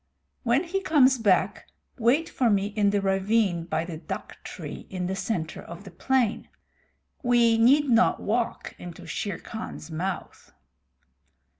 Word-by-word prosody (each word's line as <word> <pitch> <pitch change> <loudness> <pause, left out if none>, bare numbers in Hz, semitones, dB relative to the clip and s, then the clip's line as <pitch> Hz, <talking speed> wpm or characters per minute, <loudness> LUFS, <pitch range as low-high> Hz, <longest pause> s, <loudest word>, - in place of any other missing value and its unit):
When 250 +5 +2
he 380 +3 -2
comes 270 -8 +4
back 200 -5 +1 0.3
wait 255 +8 +3
for 250 -3 +1
me 200 -2 +2
in 205 -2 +3
the 200 0 +1
ravine 195 -2 +1
by 165 -1 -1
the 165 -3 -7
dhak - - -6
tree - - -8
in 185 -1 -3
the 190 +2 -2
center 185 -5 -3
of 170 +3 -10
the 195 - -11
plain. 245 +4 0 0.7
We 240 -2 +4
need 280 +6 +5
not 240 -2 +4
walk 230 +2 -2
into 175 -2 -9
Shere 200 -5 -3
Khan's 220 -7 -8
mouth." 180 +4 -5
215 Hz, 145 wpm, -26 LUFS, 185-245 Hz, 0.7 s, need